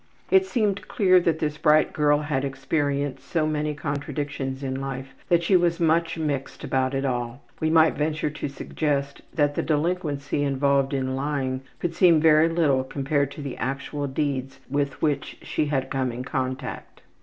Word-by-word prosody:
It 380 0 +5
seemed 210 - 0
clear 185 -3 +4
that 165 -2 +1
this 150 -1 -2
bright 155 0 +4
girl 145 -1 +3
had 145 -3 -1
experienced 140 +1 -1
so 160 -3 0
many 150 -1 -1
contradictions 145 -2 -4
in 135 0 -3
life 135 0 -5 0.2
that 170 -1 +4
she 190 - +3
was 175 -1 +3
much 165 0 +2
mixed 145 -4 -3
about 130 0 0
it 135 +1 -1
all. 120 0 -3 0.2
We 160 - +1
might 160 0 +5
venture 150 0 -1
to 150 - -4
suggest 140 0 -2
that 145 -2 +2
the - - -1
delinquency 150 -3 -1
involved 140 0 +1
in 130 -1 -1
lying 135 -2 -2 0.2
could 170 -1 -2
seem 170 -2 +5
very 155 +1 +5
little 150 -6 +2
compared 140 +1 -1
to 150 - -8
the 140 -3 -5
actual 140 +2 -3
deeds 135 -1 -2
with 140 0 -2
which 145 -3 -1
she 150 - -1
had 135 -2 -1
come 130 -2 0
in 120 +2 -5
contact. 130 -1 -4
145 Hz, 170 wpm, -25 LUFS, 135-155 Hz, 0.2 s, It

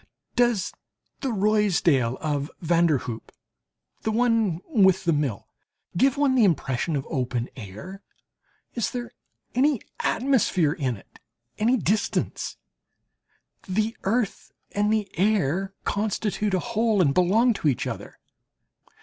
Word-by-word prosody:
Does 240 -6 +2 0.5
the 270 - -2
Ruysdael 190 - +2
of 145 -1 -1
van 170 0 +3
der 155 -4 +3
Hoop 115 -2 -6 0.7
(the - - -1
one 225 -6 +2
with 190 - +4
the 170 -2 +2
Mill) 140 -9 -2 0.5
give 265 +9 +3
one 285 -2 +3
the 250 -3 +4
impression 160 - +1
of 135 - -2
open 125 -2 -2
air? 125 - -9 0.7
Is 235 - -1
there 240 -1 -5 0.4
any 275 +1 +3 0.2
atmosphere 220 - +2
in 135 - -2
it - - -19 0.4
any 235 +4 +3
distance? 210 0 -1 1.1
The 215 +4 0
earth 220 +1 -1 0.2
and 205 +1 +1
the 215 -2 +1
air 195 -1 +1
constitute 210 -1 -1
a - - +1
whole 225 0 +1
and 145 -7 +4
belong 215 - +4
to 180 - -2
each 135 -5 +1
other. - - -6
195 Hz, 125 wpm, -25 LUFS, 155-225 Hz, 1.1 s, with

